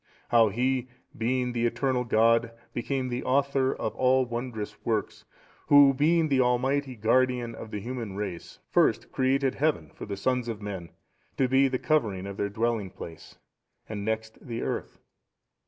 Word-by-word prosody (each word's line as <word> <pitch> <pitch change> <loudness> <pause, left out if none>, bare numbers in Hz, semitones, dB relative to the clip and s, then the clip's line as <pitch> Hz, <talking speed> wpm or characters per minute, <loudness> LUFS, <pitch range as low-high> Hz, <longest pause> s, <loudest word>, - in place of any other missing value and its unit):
How 115 -2 +5
He, 125 +4 0 0.3
being 125 +2 0
the 120 0 +1
eternal 130 +1 0
God, 115 +1 +3 0.2
became 130 +1 -2
the 120 +1 -3
Author 135 0 +2
of 110 - -3
all 130 0 +3
wondrous 120 -3 -5
works, 110 -2 -2 0.4
Who 145 -1 +7
being 160 +4 +3
the 135 -3 +3
Almighty 130 +2 +1
Guardian 120 +2 +1
of 110 - -9
the 105 - -4
human 115 -2 -5
race, 95 -4 -5
first - - +2
created 135 0 +1
heaven 140 - 0
for - - -8
the 100 -1 -4
sons 125 +3 0
of 115 -3 -4
men 95 -5 -6 0.5
to 130 - +3
be 135 +2 +4
the 130 -1 -1
covering 110 -12 0
of 100 0 -7
their 100 - -1
dwelling 110 -1 -1
place, 80 -2 -11 0.5
and 105 -2 -5
next 110 +1 -3
the 115 -4 -4
earth." - - -4
120 Hz, 160 wpm, -27 LUFS, 110-130 Hz, 0.5 s, Who